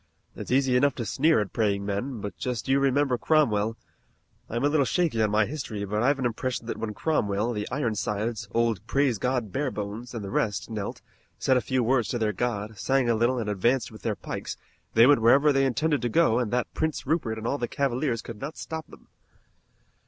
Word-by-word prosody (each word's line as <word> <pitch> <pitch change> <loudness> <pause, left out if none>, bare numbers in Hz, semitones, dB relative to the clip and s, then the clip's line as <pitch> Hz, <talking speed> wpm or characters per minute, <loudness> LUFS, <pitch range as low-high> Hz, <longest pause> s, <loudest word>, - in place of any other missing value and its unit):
"It's - - -7
easy 130 0 +3
enough 140 +1 +3
to 120 - -4
sneer 155 +6 +3
at 100 - -5
praying 100 -3 0
men, 105 +4 -3
but 105 - -5
just 125 -1 -4
you 135 +1 +3
remember 135 -2 +2
Cromwell. 115 -8 +2 0.7
I'm 120 +3 -2
a - - +5
little 145 -1 +3
shaky 150 -5 +1
on 110 - +3
my 105 +1 +3
history, 120 -6 -4
but 105 +2 -1
I've 140 +4 +3
an 130 - -2
impression 120 +1 -2
that 115 - -4
when 105 -2 -4
Cromwell, 115 -7 0
the 105 -1 -3
Ironsides, 110 -4 -2
old 115 -3 +1
Praise 135 -5 +1
God 125 -4 -1
Barebones, 120 -3 -4
and 110 -3 -4
the 95 - -6
rest 105 +2 -1
knelt, 105 -3 -5 0.3
said 130 - +2
a 125 - +3
few 130 0 0
words 120 -1 +2
to 120 - -2
their 110 -2 0
God, 105 -2 -3
sang 130 -3 +2
a - - +2
little 120 +3 +2
and 115 -3 -2
advanced 115 +6 +1
with 110 - -12
their - - -1
pikes, - - -6 0.4
they 115 +1 +8
went 140 -2 +5
wherever 140 +6 +5
they 135 0 +3
intended 145 +2 0
to 120 - 0
go 125 -4 +3
and 120 -4 -1
that 125 +1 -1
Prince 160 -1 -2
Rupert 135 -7 0
and 110 - -6
all 140 +4 -1
the 120 - -1
Cavaliers 130 -3 -1
could 115 -3 -9
not 150 +4 -5
stop 160 -1 -6
them." - - -16
120 Hz, 210 wpm, -26 LUFS, 110-135 Hz, 0.7 s, they